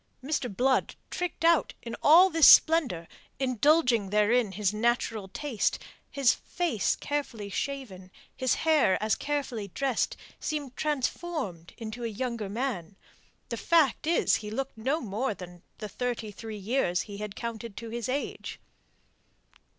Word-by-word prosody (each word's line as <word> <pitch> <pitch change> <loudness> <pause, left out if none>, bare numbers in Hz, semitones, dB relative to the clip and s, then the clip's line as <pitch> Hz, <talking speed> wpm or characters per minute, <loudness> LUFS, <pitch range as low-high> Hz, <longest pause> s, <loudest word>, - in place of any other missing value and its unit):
Mr. 270 -4 -2
Blood 260 +1 +2 0.2
tricked 355 -2 -3
out 335 -2 +3
in 230 -1 -5
all 355 +5 +7
this 325 -1 +6
splendour 260 - +6 0.3
indulging 255 -3 +2
therein 210 +1 +2
his 205 0 0
natural 225 -2 0
taste 255 +3 -1 0.3
his 275 -3 +3
face 330 - -1
carefully 250 -8 -4
shaven, 210 -9 -5 0.3
his 260 -2 +1
hair 305 -11 +4
as 215 0 +1
carefully 275 -8 -2
dressed, 260 +5 -1 0.2
seemed 290 -4 -4
transformed 290 - -3
into 225 +1 -6
a - - 0
younger 230 -1 -3
man. 205 -5 -3 0.5
The - - -3
fact 310 -3 +2
is 335 - +3
he 210 - -7
looked 270 +5 -4
no 265 +9 -1
more 215 +1 -2
than 175 -2 -11 0.2
the 215 - -6
thirty 230 0 -3
three 220 +1 -8
years 200 -4 0
he 205 -1 -8 0.2
counted 230 -2 -6
to 230 -1 -7
his 235 0 -4
age. 280 +3 -4
240 Hz, 135 wpm, -28 LUFS, 210-280 Hz, 0.5 s, all